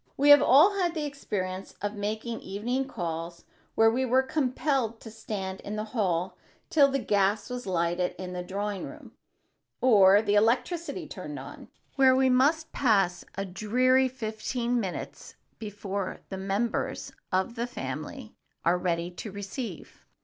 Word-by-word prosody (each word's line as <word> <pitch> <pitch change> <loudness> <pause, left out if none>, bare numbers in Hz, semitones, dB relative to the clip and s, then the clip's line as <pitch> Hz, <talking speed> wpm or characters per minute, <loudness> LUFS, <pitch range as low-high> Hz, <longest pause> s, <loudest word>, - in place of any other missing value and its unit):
We 285 +2 +4
have 290 - +9
all 360 +10 +6
had 350 -2 0
the 305 -2 -2
experience 195 -10 -4
of 205 0 -3
making 215 +3 -3
evening 240 +7 -2
calls 170 -5 -5 0.3
where 225 0 +5
we 255 +3 0
were 260 +1 +3
compelled 260 -4 0
to 225 - -10
stand 200 -3 -5
in 210 - -5
the 215 - -2
hall 185 -5 -1 0.3
till 285 -3 +6
the 275 - 0
gas 205 -1 +1
was 250 -3 -5
lighted 175 0 0
in 180 0 -6
the 180 - -3
drawing 200 +2 -3
room - - -11 0.7
or 205 -4 +6
the 205 -1 +1
electricity 250 - +1
turned - - -7
on, - - -10 0.3
where 265 -1 +6
we 260 0 +3
must 300 +6 +2
pass 195 -8 +2
a 195 +1 -2
dreary 250 +7 +2
fifteen 240 0 -2
minutes 190 -5 -6 0.2
before 200 -2 -5
the 190 - -5
members 195 +5 -2 0.2
of 190 +5 0
the 235 +1 -3
family 245 - -6 0.3
are 175 +2 +3
ready 175 -1 -1
to 200 +4 -7
receive. 200 - -7
215 Hz, 150 wpm, -28 LUFS, 190-255 Hz, 0.7 s, have